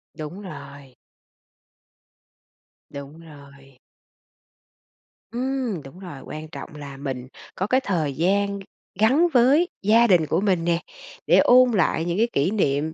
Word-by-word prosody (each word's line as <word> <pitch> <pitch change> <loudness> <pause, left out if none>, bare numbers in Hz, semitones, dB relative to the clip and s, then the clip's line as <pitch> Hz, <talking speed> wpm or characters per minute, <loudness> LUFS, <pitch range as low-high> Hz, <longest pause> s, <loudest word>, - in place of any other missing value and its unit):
Đúng 155 +6 -7
rồi. 140 -8 -11 2.0
Đúng 140 +3 -9
rồi. 140 -4 -16 1.5
Ừm, 250 - -2
đúng 135 +7 -13
rồi, 175 -8 -9
quan 155 +1 -7
trọng 155 - -9
là 140 -2 -9
mình 130 -3 -5 0.3
có 190 - -2
cái 260 +4 +2
thời 160 -7 -1
gian 200 +5 0
g - - -10 0.4
gắn 265 +11 +4
với 270 +8 +4
gia 225 +4 +4
đình 175 -6 +4
của 160 +4 0
mình 185 -5 +1
nè, 170 -1 +1 0.5
để - - +5
ôn 255 0 +6
lại 175 -5 +1
những 175 +1 -2
cái 230 +2 +3
kỷ 145 +7 +1
niệm, 155 -6 0
175 Hz, 140 wpm, -23 LUFS, 145-215 Hz, 2.0 s, ôn